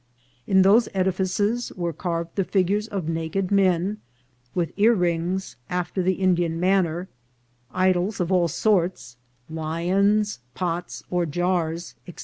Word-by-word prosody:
In 190 Hz, -1 st, +5 dB
those 215 Hz, +5 st, +5 dB
Edifices 190 Hz, +5 st, 0 dB
were 170 Hz, -3 st, -3 dB
carved 170 Hz, +1 st, -3 dB
the 195 Hz, -, +1 dB
Figures 200 Hz, +3 st, +1 dB
of 195 Hz, -7 st, -4 dB
naked 165 Hz, +4 st, -2 dB
Men, 195 Hz, +1 st, +2 dB, 0.6 s
with 170 Hz, -2 st, 0 dB
Earrings 185 Hz, -, +1 dB
after 180 Hz, +1 st, -2 dB
the 185 Hz, +1 st, +2 dB
Indian 175 Hz, -3 st, +1 dB
manner, 180 Hz, -1 st, +1 dB, 0.6 s
Idols 185 Hz, +2 st, +1 dB
of 180 Hz, 0 st, -1 dB
all 180 Hz, -2 st, +3 dB
Sorts, 175 Hz, -, 0 dB, 0.3 s
Lions, 180 Hz, -, 0 dB, 0.2 s
Pots 175 Hz, -1 st, -3 dB
or 175 Hz, -1 st, +1 dB
Jarrs," 175 Hz, +1 st, -1 dB
&c. 175 Hz, -, -10 dB
180 Hz, 125 wpm, -24 LUFS, 170-195 Hz, 0.6 s, In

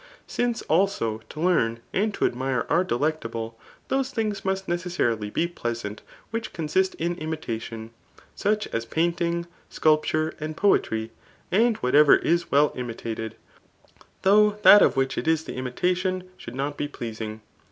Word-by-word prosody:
Since, 245 Hz, -1 st, -1 dB
also, 160 Hz, -, +1 dB
to 155 Hz, -, -9 dB
Ifara^ 140 Hz, -11 st, +2 dB, 0.2 s
andto 210 Hz, +1 st, +1 dB
admire 130 Hz, +1 st, -1 dB
are 170 Hz, +3 st, +4 dB
delectable, 120 Hz, -7 st, -2 dB, 0.3 s
those 270 Hz, -1 st, +1 dB
things 215 Hz, -3 st, -2 dB
must 190 Hz, 0 st, -1 dB
necessarily 170 Hz, -12 st, -1 dB
be 165 Hz, -, 0 dB
pleasant 120 Hz, -10 st, -5 dB, 0.3 s
which 230 Hz, 0 st, -4 dB
consist 185 Hz, +4 st, 0 dB
in 170 Hz, +1 st, -1 dB
imitation,, 115 Hz, -8 st, -5 dB, 0.4 s
such 210 Hz, +1 st, 0 dB
as 115 Hz, -, -2 dB
painting, 170 Hz, +4 st, 0 dB, 0.2 s
sculpture' 155 Hz, 0 st, +2 dB
suid 155 Hz, 0 st, -4 dB
poetry; 110 Hz, -, +1 dB, 0.4 s
:an4 225 Hz, +4 st, +4 dB
whatever 145 Hz, +4 st, +6 dB
is 170 Hz, +1 st, +1 dB
well 145 Hz, +1 st, +4 dB
imitated, 115 Hz, -2 st, -5 dB, 0.9 s
though 210 Hz, +2 st, +5 dB
that 205 Hz, -, +10 dB
of -, -, +4 dB
which 135 Hz, 0 st, 0 dB
it -, -, -5 dB
is 160 Hz, -1 st, +2 dB
the -, -, -7 dB
imitation 180 Hz, +8 st, -1 dB
should 115 Hz, -, -10 dB
not 140 Hz, +2 st, -3 dB
be 145 Hz, -, -2 dB
pleasing. 110 Hz, -5 st, -6 dB
155 Hz, 140 wpm, -25 LUFS, 120-185 Hz, 0.9 s, that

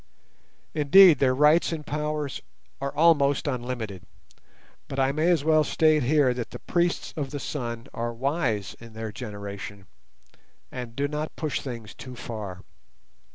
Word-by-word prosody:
Indeed, 155 Hz, +1 st, +7 dB
their 130 Hz, -2 st, +3 dB
rights 150 Hz, +5 st, +4 dB
and 155 Hz, -2 st, -4 dB
powers 150 Hz, -1 st, -3 dB, 0.4 s
are 140 Hz, -, -2 dB
almost 145 Hz, -3 st, +4 dB
unlimited, 120 Hz, -, -3 dB, 0.9 s
but 135 Hz, -, -6 dB
I 135 Hz, 0 st, +3 dB
may 155 Hz, +4 st, +1 dB
as 170 Hz, -5 st, +3 dB
well 155 Hz, 0 st, +4 dB
state 155 Hz, 0 st, +3 dB
here 135 Hz, 0 st, +3 dB
that 120 Hz, -2 st, -5 dB
the -, -, -7 dB
priests 175 Hz, 0 st, -1 dB
of 145 Hz, -3 st, -3 dB
the 145 Hz, -, -5 dB
Sun 120 Hz, -5 st, -4 dB
are 120 Hz, +1 st, -2 dB
wise 115 Hz, -, -1 dB
in 115 Hz, -1 st, -12 dB
their 110 Hz, 0 st, -5 dB
generation, 100 Hz, -3 st, -7 dB, 0.9 s
and 125 Hz, -3 st, -7 dB
do 140 Hz, +2 st, 0 dB
not 150 Hz, +1 st, -4 dB
push 155 Hz, -6 st, -2 dB
things 115 Hz, -6 st, -7 dB
too 130 Hz, -1 st, -10 dB
far. 105 Hz, -6 st, -7 dB
135 Hz, 150 wpm, -26 LUFS, 115-150 Hz, 0.9 s, Indeed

